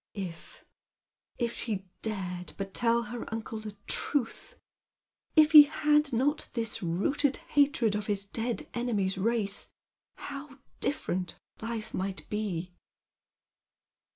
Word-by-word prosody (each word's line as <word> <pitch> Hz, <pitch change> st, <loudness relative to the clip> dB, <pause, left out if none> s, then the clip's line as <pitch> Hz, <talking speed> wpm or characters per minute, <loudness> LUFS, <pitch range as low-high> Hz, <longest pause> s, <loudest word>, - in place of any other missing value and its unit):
If 180 Hz, -5 st, -7 dB, 0.3 s
— -, -, -65 dB
if 235 Hz, -1 st, -1 dB
she 200 Hz, -5 st, -3 dB, 0.2 s
dared 185 Hz, -5 st, -3 dB
but 195 Hz, -1 st, -5 dB
tell 235 Hz, 0 st, +2 dB
her 235 Hz, +1 st, -6 dB
uncle 225 Hz, 0 st, -4 dB
the 215 Hz, -1 st, -8 dB
truth! 290 Hz, -, -1 dB, 0.8 s
If 310 Hz, -1 st, +7 dB
he 305 Hz, -2 st, +13 dB
had 295 Hz, 0 st, +3 dB
not 280 Hz, +6 st, +1 dB
this 230 Hz, -2 st, -1 dB
rooted 230 Hz, -, +1 dB, 0.2 s
hatred 275 Hz, -7 st, +4 dB
of 210 Hz, 0 st, -2 dB
his 200 Hz, -2 st, 0 dB
dead 230 Hz, +4 st, -3 dB
enemy's 205 Hz, -6 st, 0 dB
race, 210 Hz, -1 st, 0 dB, 0.5 s
how 280 Hz, -1 st, -8 dB, 0.2 s
different 185 Hz, -10 st, -2 dB, 0.2 s
life 225 Hz, -1 st, -4 dB
might 190 Hz, +1 st, -3 dB
be 185 Hz, -5 st, -2 dB
225 Hz, 120 wpm, -30 LUFS, 195-265 Hz, 0.8 s, he